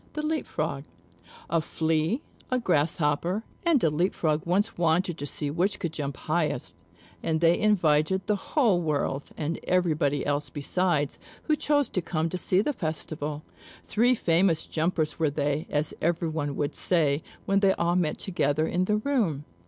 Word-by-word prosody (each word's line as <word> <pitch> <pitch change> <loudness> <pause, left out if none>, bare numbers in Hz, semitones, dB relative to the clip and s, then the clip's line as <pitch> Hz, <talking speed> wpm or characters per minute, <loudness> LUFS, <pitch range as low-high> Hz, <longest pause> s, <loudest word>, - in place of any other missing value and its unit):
THE 305 0 -3
LEAP 315 0 -1
FROG - - -3 0.6
A 165 - +1
Flea, 160 - 0 0.3
a 255 - +1
Grasshopper, 170 +1 +1 0.2
and 335 -7 +3
a 160 - +5
Leap 175 +6 0
frog 155 -2 +1
once 205 +6 +1
wanted 175 +1 +1
to 145 - -4
see 145 +1 -3
which 180 +6 0
could 170 -3 -4
jump 140 -2 -4
highest; 155 0 -2 0.4
and 160 -1 0
they 170 +1 +4
invited 190 -3 +2
the 210 - +1
whole 210 - +1
world, 145 -3 -1
and 160 +2 -2
everybody 155 -6 +1
else 145 0 -1
besides 150 +1 0 0.2
who 310 - +2
chose 290 -2 +2
to 185 - -1
come 160 -1 -1
to 180 - -3
see 185 +3 +2
the 295 - 0
festival. 155 - -4 0.4
Three 245 +4 +3
famous 170 -4 +2
jumpers 160 -1 -1
were 160 -2 +3
they, 145 +2 -1
as 150 +1 0
everyone 160 -3 -1
would 145 - -1
say, 155 -4 +2 0.2
when 195 0 +3
they 195 -1 +4
all 170 -1 0
met 170 -4 +1
together 155 -5 0
in 180 +3 0
the 210 +2 +2
room. 210 - 0
165 Hz, 165 wpm, -27 LUFS, 150-190 Hz, 0.6 s, a